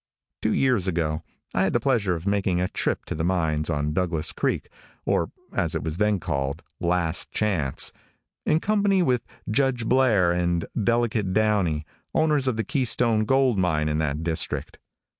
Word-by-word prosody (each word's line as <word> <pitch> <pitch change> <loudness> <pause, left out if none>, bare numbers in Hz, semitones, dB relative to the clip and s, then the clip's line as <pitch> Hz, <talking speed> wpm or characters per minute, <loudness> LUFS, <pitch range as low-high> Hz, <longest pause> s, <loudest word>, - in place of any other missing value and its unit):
Two - - +1
years 125 -8 +2
ago 80 -3 -1 0.3
I 90 - +1
had 95 - +1
the 120 - +3
pleasure 110 -8 +1
of 85 +1 -7
making 100 -3 +1
a 90 - +1
trip - - -1
to - - -4
the 80 - -3
mines 80 -4 0
on 75 -1 -1
Douglas 85 -3 0
creek, - - -1 0.4
or, - - +1 0.2
as - - 0
it - - -2
was 80 0 -3
then 105 -1 +2
called, 70 0 -3 0.2
Last 85 -2 +1
Chance, 90 -11 0 0.5
in 155 - +2
company 200 -3 +2
with 125 -6 +2 0.3
Judge 125 0 +1
Blair 115 -9 +3
and 85 -1 0 0.2
Delegate 115 -3 +1
Downey, 95 -8 +1 0.3
owners 150 -4 +2
of 125 -4 0
the 110 - 0
Keystone 120 -5 +1
gold 130 -3 +3
mine 80 -4 +1
in 75 0 0
that 75 0 -1
district. 80 -1 -2
95 Hz, 165 wpm, -25 LUFS, 80-120 Hz, 0.5 s, the